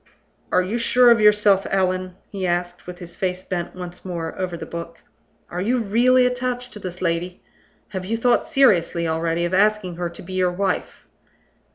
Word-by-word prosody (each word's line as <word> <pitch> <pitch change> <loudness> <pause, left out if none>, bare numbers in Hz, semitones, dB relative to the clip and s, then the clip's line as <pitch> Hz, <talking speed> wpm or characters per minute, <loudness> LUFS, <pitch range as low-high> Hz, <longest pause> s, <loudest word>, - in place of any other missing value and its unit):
"Are 185 - +3
you 215 +6 -2
sure 245 +1 +5
of 230 - +5
yourself, 210 -2 +4
Allan?" 185 -1 0 0.2
he 190 -2 -3
asked, 175 0 -2
with 180 0 -7
his 175 -2 -11
face 185 -1 -2
bent 175 -2 -4
once 180 -1 -8
more 170 -3 -4
over 180 -2 -3
the - - -7
book. 170 0 -7 0.5
"Are 180 - -3
you 240 +6 +1
really 245 +4 +3
attached 250 0 -2
to 210 - -6
this 185 -2 -6
lady? 175 +1 -2 0.5
Have 190 -3 -5
you 225 +4 -1
thought 245 +1 +2
seriously 175 -10 +3
already 165 +1 0
of 175 - -3
asking 200 -3 +2
her 175 -1 -2
to 170 - -11
be 185 +2 -9
your 185 -1 +1
wife?" 190 0 -2
185 Hz, 185 wpm, -22 LUFS, 175-210 Hz, 0.5 s, sure